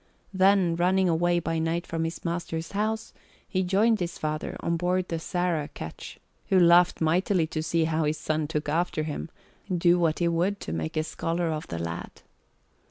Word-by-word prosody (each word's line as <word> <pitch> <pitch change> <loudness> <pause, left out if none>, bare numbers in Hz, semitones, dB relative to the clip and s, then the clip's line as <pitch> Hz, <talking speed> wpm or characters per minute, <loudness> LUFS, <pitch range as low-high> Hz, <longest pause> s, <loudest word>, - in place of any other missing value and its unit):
Then, 190 -2 +4
running 185 +2 +3
away 175 +1 +2
by 165 -1 -1
night 165 +2 -1
from 165 0 -2
his 165 +2 -6
master's 170 -1 -3
house, 220 +2 -2 0.3
he 185 - 0
joined 210 +5 +3
his 175 -1 -3
father 155 0 -3
on 170 - -1
board 180 +2 0
the 165 - -2
Sarah 175 -3 -1
ketch, 80 - -9 0.3
who 190 - +5
laughed 175 0 +5
mightily 175 +2 +2
to 155 0 -3
see 160 +1 +1
how 160 0 0
his 150 +1 0
son 155 -1 -1
took 150 -1 -3
after 160 +1 0
him, 155 +1 -4 0.4
do 175 0 +3
what 165 -2 +2
he 170 - +1
would 175 +4 0
to - - -5
make 80 - -3
a 155 - +2
scholar 165 +1 -2
of 155 0 -4
the 85 - -5
lad. 85 0 -6
170 Hz, 185 wpm, -27 LUFS, 160-180 Hz, 0.4 s, who